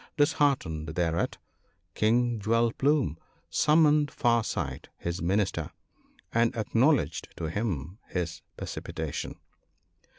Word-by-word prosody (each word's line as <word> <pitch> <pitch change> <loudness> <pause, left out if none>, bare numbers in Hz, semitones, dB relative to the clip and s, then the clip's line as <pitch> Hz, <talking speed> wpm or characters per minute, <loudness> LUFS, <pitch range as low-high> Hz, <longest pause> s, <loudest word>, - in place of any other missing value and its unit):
Disheartened 95 - +1
thereat, 85 -1 0 0.6
King 120 +1 +2
Jewel 115 +3 +2
plume 135 - +1 0.3
summoned 150 -1 +4
Far 120 -5 +2
sight 75 -12 -4
his 85 +1 -3
Minister, 90 -3 0 0.6
and 115 0 +3
ac 110 - -2
knowledged 115 - +3
to 80 -2 -3
him 95 - -3
his 85 -2 -3 0.2
precipitation. - - -4
105 Hz, 100 wpm, -28 LUFS, 85-125 Hz, 0.6 s, summoned